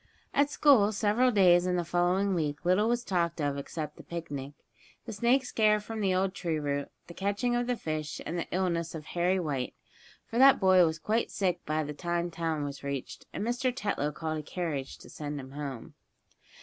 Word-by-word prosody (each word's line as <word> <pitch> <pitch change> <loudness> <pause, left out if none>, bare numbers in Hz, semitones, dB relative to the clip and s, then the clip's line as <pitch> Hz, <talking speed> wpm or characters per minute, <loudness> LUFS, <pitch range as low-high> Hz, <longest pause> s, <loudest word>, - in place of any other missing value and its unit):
At 285 0 +3
school 265 -9 +5
several 220 +4 +2
days 180 -5 +5
in 180 - +1
the 175 -1 -1
following 180 +3 +1
week 150 -2 -2
little 195 +5 +3
was 240 0 0
talked 170 -3 -1
of 145 -2 0
except 150 +2 -5
the - - -11
picnic, 145 -5 -6 0.5
the 225 - -6
snake 245 +5 +2
scare 215 -3 +3
from 220 +1 -6
the 195 -2 +2
old 190 0 +1
tree 165 -5 -2
root, 140 -1 -2 0.2
the 170 - -11
catching 200 +6 0
of 240 0 0
the 250 - +1
fish, 155 -3 -4
and 170 - -3
the 170 - -2
illness 170 -3 -1
of 155 -2 -7
Harry 180 +3 +1
White, 140 -7 -2 0.5
for 235 - -3
that 270 +1 +7
boy 185 -2 +6
was 160 0 -2
quite 215 +8 0
sick 180 -3 -1
by 155 +1 0
the 150 0 -5
time 175 +2 -2
town 165 -2 -2
was 140 -1 -6
reached, 140 -2 -5
and 205 - -3
Mr. 245 +2 0
Tetlow 200 - -2
called 155 0 -3
a - - -4
carriage 150 -4 -4
to - - -14
send 145 -1 -5
him 130 0 -9
home. 140 -4 -6
175 Hz, 200 wpm, -29 LUFS, 150-210 Hz, 0.5 s, that